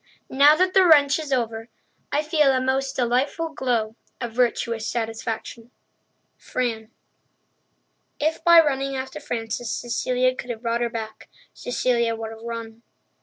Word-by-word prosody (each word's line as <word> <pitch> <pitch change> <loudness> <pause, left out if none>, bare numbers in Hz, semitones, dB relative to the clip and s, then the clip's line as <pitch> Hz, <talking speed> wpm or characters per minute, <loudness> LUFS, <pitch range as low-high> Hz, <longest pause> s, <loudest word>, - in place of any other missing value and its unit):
Now 285 +3 +6
that 370 +2 +1
the 380 - +6
wrench 295 -4 +5
is 305 -3 -6
over, 230 -3 -1 0.4
I 295 - +1
feel 300 -3 +3
a 260 - +1
most 265 +1 -1
delightful 260 +7 0
glow 240 -7 -1 0.2
of 240 -2 -4
virtuous 230 -2 0
satisfaction! 225 0 -4 0.7
Fran. 225 -3 -3 1.3
If 315 +2 -1
by 340 -1 +8
running 275 -2 -1
after 265 0 -5
Frances 225 0 -4
Cecilia 250 +2 0
could 250 -1 -8
have 235 0 -5
brought 235 0 -1
her 240 - 0
back, 220 -2 -7 0.2
Cecilia 235 -2 0
would 225 0 -6
have 225 0 -11
run. 230 -1 -7
245 Hz, 140 wpm, -23 LUFS, 230-275 Hz, 1.3 s, by